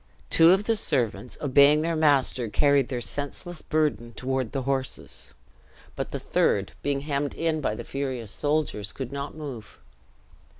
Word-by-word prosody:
Two 165 0 +7
of 190 +3 +5
the 225 +1 +1
servants, 120 - -1
obeying 145 +1 +5
their 165 +1 0
master, 140 -6 +3
carried 140 +5 +3
their 125 -2 -3
senseless 150 +6 -3
burden 150 -7 -1
toward 130 -2 -2
the 135 - -2
horses; 135 0 -3 0.6
but - - -3
the - - -4
third, 100 -1 +1
being 140 -1 -1
hemmed 145 -1 -2
in 160 -2 0
by 110 - -1
the - - -6
furious 130 -6 -4
soldiers, 145 -8 -1
could 130 -2 -6
not 140 +1 -5
move. 135 - -8
140 Hz, 155 wpm, -26 LUFS, 125-150 Hz, 0.6 s, Two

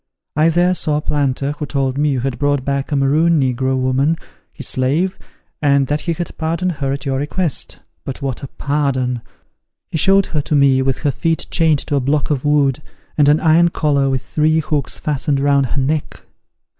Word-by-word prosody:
I 155 +2 +4
there 175 +2 +2
saw 155 -4 +1
a - - -2
planter, 140 -2 -1
who 150 0 -5
told 135 -2 -1
me 150 +1 +1
you 135 -3 0
had 130 0 -3
brought 145 -2 0
back 140 0 -2
a - - +1
Maroon 155 +4 +3
negro 130 0 0
woman, 130 +5 +1 0.3
his - - -6
slave, 155 +9 0 0.5
and 140 -2 +3
that 150 +1 0
he 170 - -1
had 175 +1 -5
pardoned 170 +3 -1
her 140 -4 -3
at 140 0 -4
your 135 -1 -1
request. 155 +2 -2 0.2
But 135 - -6
what 135 -4 -4
a 140 - -6
pardon! 130 -4 -1 0.7
he 160 - -1
showed 195 +3 +4
her 150 - -2
to 150 - -1
me 135 -2 +4
with 130 -1 0
her 145 - +2
feet 165 +5 -1
chained 160 -4 +2
to 145 - 0
a - - +3
block 140 +3 0
of 140 -3 -1
wood, 145 -2 +2 0.3
and 145 -2 +4
an 150 +2 +4
iron 165 +1 +4
collar 140 -4 +1
with 130 -1 -1
three 155 +1 +1
hooks 150 -3 -1
fastened 145 -1 0
round 140 -1 +2
her - - -4
neck! 145 +3 -2
145 Hz, 200 wpm, -18 LUFS, 135-155 Hz, 0.7 s, I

